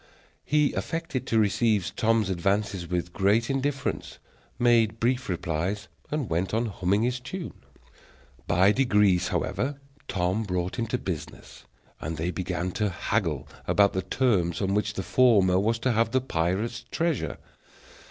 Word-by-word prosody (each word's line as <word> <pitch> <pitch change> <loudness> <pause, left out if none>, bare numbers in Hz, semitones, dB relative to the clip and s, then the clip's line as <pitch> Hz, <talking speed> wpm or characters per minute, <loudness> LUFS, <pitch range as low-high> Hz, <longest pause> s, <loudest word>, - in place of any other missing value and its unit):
He 150 -1 +2
affected 165 -5 -3
to 115 - +1
receive 105 -2 +2
Tom's 110 -3 +2
advances 95 0 0
with 85 0 -2
great 105 +6 +2
indifference, 135 0 -2 0.4
made 115 -2 +3
brief 125 0 0
replies, 90 +4 -2 0.2
and 150 -5 -2
went 90 +5 -1
on 115 +2 +1
humming 100 0 0
his 125 +1 0
tune. 170 +8 -6 0.9
By 90 +3 +4
degrees, 105 -7 +3
however, 140 +2 -2 0.3
Tom 95 +3 0
brought 90 -2 -2
him 115 - -1
to 125 - -1
business, 90 -10 -7 0.3
and 80 +1 -4
they 85 +3 -1
began 90 +1 -3
to 105 +2 0
haggle 85 - -1 0.2
about 100 -1 +4
the 95 - 0
terms 95 -4 +1
on 95 0 0
which 105 0 0
the 95 - -3
former 100 -6 +4
was 110 +3 +1
to 125 +2 0
have 115 0 +2
the 130 +3 +1
pirate's 110 +3 -1
treasure. 165 -3 -1
105 Hz, 145 wpm, -27 LUFS, 90-120 Hz, 0.9 s, By